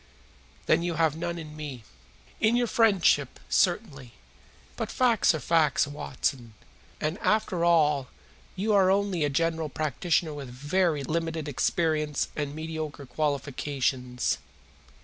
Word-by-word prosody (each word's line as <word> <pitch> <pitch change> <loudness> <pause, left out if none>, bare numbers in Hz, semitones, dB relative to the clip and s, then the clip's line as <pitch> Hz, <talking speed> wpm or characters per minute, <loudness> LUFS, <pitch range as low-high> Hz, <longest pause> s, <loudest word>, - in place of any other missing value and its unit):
"Then - - +3
you 170 -1 -2
have 160 -2 +2
none 170 +1 -3
in 155 -2 -8
me?" 145 -6 -7 0.6
"In 220 +2 +3
your 245 0 +2
friendship, 195 - +3
certainly. 150 - 0 0.6
But - - -3
facts 235 -8 +3
are - - -3
facts, 160 -2 +3
Watson, 130 -5 -4 0.4
and, 155 +5 -2
after 195 -5 +1
all, 150 -6 +3 0.5
you 210 +3 0
are 195 -2 +5
only 195 -4 +1
a 145 - +2
general 160 +2 0
practitioner 155 +2 0
with 140 -3 -7
very 150 +4 0
limited 165 +1 -2
experience 150 +1 0
and 145 -1 -3
mediocre 155 -2 -5
qualifications. 135 -3 -1
155 Hz, 125 wpm, -27 LUFS, 145-170 Hz, 0.6 s, are